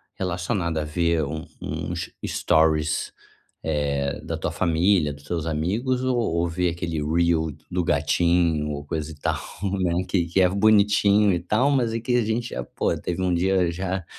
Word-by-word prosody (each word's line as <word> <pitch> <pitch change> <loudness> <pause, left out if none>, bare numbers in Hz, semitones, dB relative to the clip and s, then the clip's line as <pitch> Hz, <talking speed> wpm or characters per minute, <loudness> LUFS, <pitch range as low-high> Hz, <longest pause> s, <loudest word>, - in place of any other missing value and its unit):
relacionado 90 -2 -2
a 80 - 0
ver 85 +1 +1
um 80 +3 -4 0.2
uns - - -4 0.2
stories, 80 -1 +1 0.5
eh, 70 -2 -1
da - - -3
tua - - -2
família, 85 -2 +2
dos 70 0 -13
seus 80 +1 -3
amigos, 105 - -1
ou 130 -1 +1
ou 85 -7 0
ver 90 +1 0
aquele 85 -2 -3
reel 80 +1 +1 0.2
do 90 0 0
gatinho 80 +1 +2
ou 70 -1 -5
coisa 75 +1 -4
e - - -10
tal, 75 - -2 0.5
né, 85 +1 +1
que 90 -4 +1
que 85 +3 +1
é 90 - +5
bonitinho 100 0 +4
e 90 - +1
tal, 110 - +1
mas 125 -5 +1
aqui 115 +2 0
a 120 - +2
gente 115 +2 -1
já, 60 - -4
pô, - - -1
teve 90 +1 -3
dia 90 0 +2
já 95 +1 -3
85 Hz, 170 wpm, -24 LUFS, 80-100 Hz, 0.5 s, é